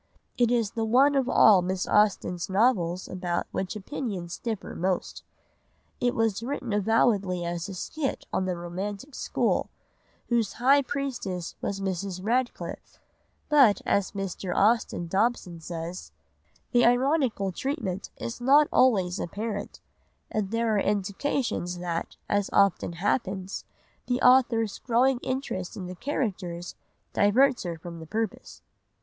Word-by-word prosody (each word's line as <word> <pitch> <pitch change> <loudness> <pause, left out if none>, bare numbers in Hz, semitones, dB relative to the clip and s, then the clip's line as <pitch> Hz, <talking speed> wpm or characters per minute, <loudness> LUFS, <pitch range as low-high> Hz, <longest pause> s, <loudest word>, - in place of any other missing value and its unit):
It 240 -2 +3
is 230 -4 +1
the 225 - -2
one 260 +6 +4
of 270 -2 +1
all 205 -6 +6
Miss 185 +1 -2
Austen's 195 -3 +2
novels 190 -4 +2
about 180 -2 -2
which 190 +1 -3
opinions 195 -5 -5
differ 225 -4 -4
most. 185 +1 -2 0.8
It 245 0 +1
was 225 -2 +1
written 245 -2 -3
avowedly 200 -4 +2
as 170 +2 -3
a 195 - -6
skit 275 - -3
on 185 - +1
the 180 -2 -2
romantic 195 +9 -5
school, - - 0 0.6
whose 235 -3 +1
high 275 +4 +4
priestess 255 -11 -4
was 195 -1 -2
Mrs. 190 -1 -3
Radcliffe; 240 +3 -2 0.5
but, 275 -9 +5
as 200 -1 +1
Mr. 195 -2 -4
Austin 215 -4 +2
Dobson 190 -2 0
says: 170 +2 -6 0.6
"The 245 -1 +4
ironical 245 -5 +2
treatment 200 - -3
is 235 +1 -6
not 285 +4 +6
always 195 -8 +3
apparent, 205 +3 -4 0.5
and 210 -3 -1
there 230 0 0
are 205 - +3
indications 200 -1 -1
that, 175 -1 -4
as 205 -1 0
often 200 -3 +3
happens, 190 +1 -2 0.4
the 245 0 +1
author's 240 -4 +4
growing 250 +2 +2
interest 255 -9 -3
in 185 - -5
the 180 - -6
characters 180 - -3 0.4
diverts 250 +6 +4
her 170 -2 -4
from 170 0 -9
her 160 - -10
purpose." 220 +5 -4
205 Hz, 130 wpm, -27 LUFS, 185-245 Hz, 0.8 s, all